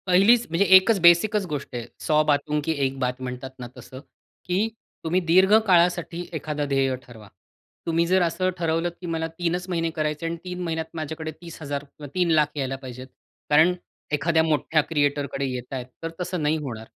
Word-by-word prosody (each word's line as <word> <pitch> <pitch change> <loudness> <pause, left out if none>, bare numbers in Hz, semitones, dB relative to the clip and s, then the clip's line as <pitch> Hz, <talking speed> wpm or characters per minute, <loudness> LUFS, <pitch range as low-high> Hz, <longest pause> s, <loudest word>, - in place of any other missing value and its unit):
पहिलीच 205 +6 +5
म्हणजे 170 +5 +2
एकच 195 +3 +6
बेसिकच 190 +4 +5
गोष्ट 145 -3 -4
आहे. 120 -1 -4
"सौ 155 -1 +2
बातों 150 0 +1
की 160 - +1
एक 135 0 -2
बात" 125 0 -2
म्हणतात 130 +1 -6
ना 120 - -6
तसं, 130 - -10 0.5
की 185 +5 +1 0.4
तुम्ही 170 +3 +1
दीर्घ 185 +4 +5
काळासाठी 175 -1 +2
एखादं 150 -2 -3
ध्येय 135 -1 +1
ठरवा. 110 -4 -14 0.6
तुम्ही 165 0 +1
जर 185 +1 +3
असं 175 +2 +1
ठरवलं 165 0 0
की - - -7
मला 165 -1 -2
3 170 +1 -2
च 180 +1 -9
महिने 165 -2 0
करायचे 155 0 -2
आणि 165 0 -2
3 180 -1 -6
महिन्यात 160 -1 -2
माझ्याकडे 160 0 -5
30,000 145 -4 -6
किंवा 145 +1 -12
3,00,000 160 -5 +3
यायला 135 -1 -2
पाहिजेत. 130 -1 -9 0.4
कारण 155 +4 +5 0.4
एखाद्या 160 +2 +2
मोठ्या 155 0 +2
क्रिएटरकडे 145 -2 0
येतायत, 125 0 -5 0.2
तर 165 - -2
तसं 180 -1 -3
नाही 150 +2 +2
होणार. 120 -7 -6
160 Hz, 175 wpm, -24 LUFS, 145-175 Hz, 0.6 s, एकच